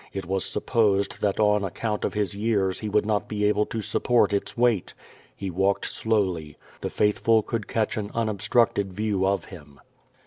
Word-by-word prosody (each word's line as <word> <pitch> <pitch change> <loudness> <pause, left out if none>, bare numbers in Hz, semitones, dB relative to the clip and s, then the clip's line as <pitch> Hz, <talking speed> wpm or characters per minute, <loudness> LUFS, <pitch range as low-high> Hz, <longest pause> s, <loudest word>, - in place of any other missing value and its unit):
It 95 -2 -4
was 95 +1 -1
supposed 100 -3 +1
that 100 0 0
on 105 -1 +3
account 105 +3 -3
o\ - - +1
his 105 -3 -2
years 100 -3 0
he 110 - -4
would 105 +1 +2
not 105 -1 0
be 105 -1 -1
able 105 0 +2
to 110 -2 -4
support 120 -1 +2
its 100 - -2
weight. 120 -6 +1 0.4
He 95 -2 -5
walked 95 +3 +1
slowly. 95 -9 -1 0.2
The - - -3
faithful 110 +1 +2
could 115 -1 -4
catch 110 -1 -1
an 105 -1 -3
unobstructed 110 -2 +1
view 100 -1 0
of 100 0 0
him. 75 -7 -13
105 Hz, 175 wpm, -25 LUFS, 95-110 Hz, 0.4 s, on